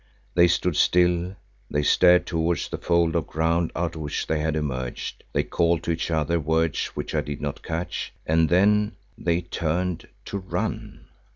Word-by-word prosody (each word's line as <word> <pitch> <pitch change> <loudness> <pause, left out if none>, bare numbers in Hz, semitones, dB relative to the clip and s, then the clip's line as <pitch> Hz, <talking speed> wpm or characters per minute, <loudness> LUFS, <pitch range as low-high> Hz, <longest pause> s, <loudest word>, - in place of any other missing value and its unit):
They 85 0 +6
stood 90 -1 +1
still, 90 +1 +3 0.3
they 75 0 0
stared 90 +4 +5
towards 85 -1 -1
the - - -5
fold 85 -2 +2
of - - 0
ground 80 +1 0
out 85 -1 -1
of 80 - -7
which 75 -1 -3
they 80 - 0
had 80 0 0
emerged; 65 -5 -4
they 70 - +1
called 85 +2 +1
to 85 - -1
each 80 +1 -2
other 80 +1 +1
words 80 0 0
which - - -4
I 75 - +2
did 75 -1 -6
not 75 -1 -4
catch, 85 +2 -4
and 80 0 +3
then—they 100 -2 +1
turned 85 0 -2 0.2
to 100 - -4
run. 95 - -4
85 Hz, 170 wpm, -25 LUFS, 80-90 Hz, 0.3 s, They